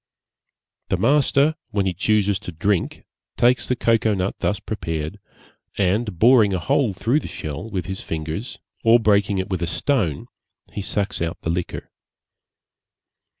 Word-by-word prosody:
The - - +1
master 145 +1 +3 0.2
when 100 -2 0
he 95 - 0
chooses 100 +1 +1
to 105 -4 -7
drink 90 +3 -1 0.3
takes 125 +1 +3
the 125 - +1
cocoa 115 -3 +2
nut 95 0 -1
thus 95 +3 0
prepared, 80 -4 -4 0.6
and 100 +1 0
boring 110 -1 +5
a - - -1
hole 115 +6 +1
through 115 +10 +1
the - - -7
shell 75 +8 -6
with 95 -6 -3
his 95 +1 -5
fingers, 80 +9 -5 0.3
or 115 0 +6
breaking 100 -2 +2
it 95 +1 -3
with 90 -2 -1
a 85 - -1
stone, 90 - 0 0.5
he 100 - -4
sucks 100 -1 -2
out 85 -1 -2
the 80 - -1
liquor. 90 +1 -4
100 Hz, 150 wpm, -22 LUFS, 90-115 Hz, 0.6 s, or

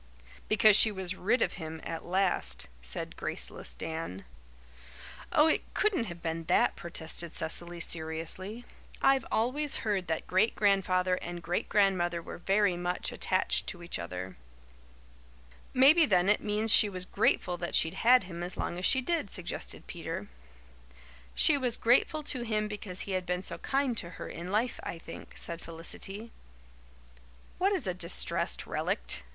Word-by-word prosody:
"Because 215 -1 +6
she 220 - +8
was 190 -2 -3
rid 205 +7 +1
of - - -1
him 160 0 -6
at 165 - -5
last," 175 - 0
said 60 0 -5
graceless - - -5
Dan. 160 - -5 1.1
"Oh, 300 - +5
it 320 - +1
couldn't 405 - +1
have 170 -4 -8
been 165 0 -3
that," - - +3
protested 170 0 -4
Cecily 175 +2 -2
seriously. 165 +8 -2 0.3
"I've 270 0 +3
always 270 +6 0
heard 195 -4 0
that 160 -1 -2
Great 190 +5 +2
Grandfather 185 -3 +2
and 175 0 -6
Great 175 +2 -2
Grandmother 185 -4 +2
were 165 - -9
very 195 +1 +2
much 175 +1 -2
attached 185 - +1
to 175 -2 -4
each 170 - -3
other." 90 +1 -6 1.3
"Maybe, 295 +5 +6
then, 185 -1 +3
it 210 - +3
means 210 +1 +3
she 210 - +7
was 185 -2 -5
grateful 180 -1 +1
that 175 0 -3
she'd 160 - +3
had 250 0 +6
him 175 -2 -8
as 175 +1 -4
long 175 - -3
as 185 - -1
she 260 - +3
did," 320 -5 -1
suggested 180 -2 -4
Peter. - - -6 1.1
"She 290 -3 +4
was 250 -3 0
grateful 260 +6 +3
to 260 -3 -3
him 215 -2 -1
because 205 -3 -6
he 200 - -5
had 185 -1 -2
been 180 +1 -1
so 170 - -5
kind 270 -3 0
to 170 - -1
her - - -6
in 175 +2 -7
life, 230 +4 0
I 170 - -5
think," 165 - -10
said 170 0 -2
Felicity. 195 +6 -7 1.3
"What 385 +2 +3
is 380 - 0
a 185 - 0
'distressed 175 -1 +1
relict'?" - - -1
185 Hz, 160 wpm, -30 LUFS, 170-220 Hz, 1.3 s, she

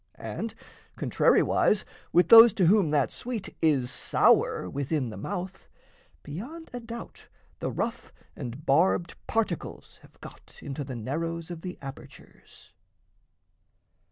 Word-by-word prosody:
And, 225 -1 -6 0.4
contrariwise, 210 - +2 0.3
with 175 +1 +4
those 230 -1 +10
to 185 - +2
whom 190 -2 +4
that 145 -2 +1
sweet 235 -5 -6
Is 140 -6 +2
sour - - +2
within 140 - -2
the - - -8
mouth, 185 - -6 0.6
beyond 250 - -8
a 245 - -4
doubt 230 0 -10 0.3
The - - -2
rough - - -4 0.2
and 130 +2 -7
barbed 170 +4 +2
particles 220 -7 -3
have - - -21
got - - -13
Into 140 +1 -5
the 130 -2 -7
narrows 165 +8 -4
of 170 -2 -7
the 180 0 -7
apertures. 135 0 -13
170 Hz, 125 wpm, -27 LUFS, 140-210 Hz, 0.6 s, those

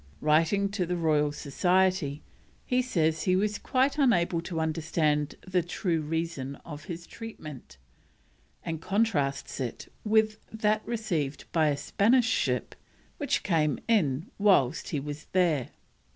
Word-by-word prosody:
Writing 165 +6 +3
to 200 -1 -2
the 180 0 -2
Royal 150 -3 +2
Society, 175 0 +1 0.4
he 250 0 +2
says 160 -10 +1
he 185 - +3
is 205 +2 +1
quite 270 +3 +1
unable 175 -10 +3
to 170 -1 -4
understand 155 -2 0
the 180 -1 +2
true 170 -1 -1
reason 155 -3 -3
of 150 -2 -8
his 170 -1 -6
treatment, 155 - -10 0.9
and 165 -1 -3
contrasts 185 -12 0
it 125 -3 -5
with 215 0 +2
that 215 -1 +1
received 170 -12 -2
by 160 -2 +3
a 145 -1 +1
Spanish 220 - +3
ship 125 - 0 0.5
which - - 0
came 155 -5 +1
in 165 - +2
whilst 175 -9 +3
he 150 - -1
was 145 +1 -6
there. 170 -8 +2
165 Hz, 135 wpm, -28 LUFS, 150-200 Hz, 0.9 s, Writing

